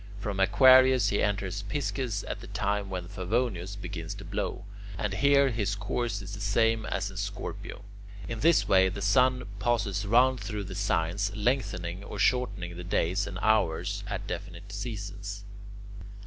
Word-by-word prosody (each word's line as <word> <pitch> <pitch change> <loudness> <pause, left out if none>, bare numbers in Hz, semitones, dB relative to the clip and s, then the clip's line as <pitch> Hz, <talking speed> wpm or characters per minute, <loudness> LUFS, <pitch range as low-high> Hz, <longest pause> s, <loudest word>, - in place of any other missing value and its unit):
From 100 -2 -3
Aquarius 130 +5 +6
he 100 - +1
enters 100 -1 -1
Pisces 125 -2 -2
at - - -5
the - - -10
time 100 0 -1
when 90 -2 -4
Favonius 100 -1 -2
begins 100 - -6
to - - -9
blow, 90 - -3 0.3
and 100 +2 -2
here 140 +4 +4
his 105 -3 -1
course 100 0 -2
is 95 +1 -8
the 100 - -6
same 110 +2 +1
as 100 0 -2
in 95 - -10
Scorpio. 100 +1 -5 0.4
In 115 -1 -4
this 165 +5 +4
way 95 -1 +5
the 100 +1 -5
sun 125 +1 +3 0.2
passes 105 -3 0
round 125 +4 +4
through 105 0 -4
the 95 - -7
signs, 95 +1 0
lengthening 100 -6 -1
or 105 - -7
shortening 95 -6 0
the 90 - -6
days 95 +2 0
and 95 - -6
hours 110 -7 +1
at - - -4
definite - - -7
seasons. 105 -2 -6
100 Hz, 160 wpm, -28 LUFS, 95-115 Hz, 0.4 s, Aquarius